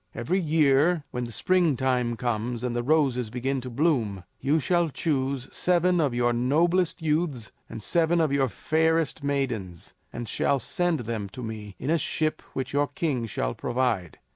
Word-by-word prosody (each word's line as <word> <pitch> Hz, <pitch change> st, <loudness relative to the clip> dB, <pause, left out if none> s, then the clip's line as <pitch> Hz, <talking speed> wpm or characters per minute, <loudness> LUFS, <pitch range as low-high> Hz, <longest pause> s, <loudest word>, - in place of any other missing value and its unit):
Every 150 Hz, +12 st, 0 dB
year 155 Hz, 0 st, +3 dB
when 125 Hz, 0 st, -3 dB
the 120 Hz, -, -8 dB
springtime 130 Hz, -, +1 dB
comes 120 Hz, 0 st, -2 dB
and 120 Hz, -1 st, -2 dB
the 120 Hz, -, 0 dB
roses 130 Hz, -4 st, +2 dB
begin 130 Hz, +3 st, -2 dB
to 125 Hz, -, -6 dB
bloom, 120 Hz, -, 0 dB, 0.2 s
you 150 Hz, +4 st, +2 dB
shall 175 Hz, +1 st, +1 dB
choose 135 Hz, -3 st, -1 dB
seven 180 Hz, 0 st, +2 dB
of 140 Hz, -5 st, 0 dB
your 120 Hz, 0 st, +2 dB
noblest 165 Hz, +8 st, +1 dB
youths 150 Hz, -7 st, -1 dB, 0.2 s
and 110 Hz, -, -6 dB
seven 170 Hz, -, +2 dB
of 160 Hz, -3 st, +2 dB
your 135 Hz, -2 st, +2 dB
fairest 160 Hz, +1 st, 0 dB
maidens, 120 Hz, -12 st, -2 dB, 0.2 s
and 120 Hz, -, -6 dB
shall 140 Hz, -, +1 dB
send 175 Hz, +1 st, 0 dB
them 110 Hz, -3 st, -4 dB
to 125 Hz, -, -7 dB
me 105 Hz, -3 st, -7 dB
in 140 Hz, -, -2 dB
a 165 Hz, -, +3 dB
ship 155 Hz, +2 st, -1 dB
which 130 Hz, 0 st, -4 dB
your 145 Hz, 0 st, +2 dB
king 145 Hz, -11 st, -2 dB
shall -, -, -2 dB
provide. 120 Hz, -8 st, -1 dB
135 Hz, 165 wpm, -26 LUFS, 120-160 Hz, 0.2 s, year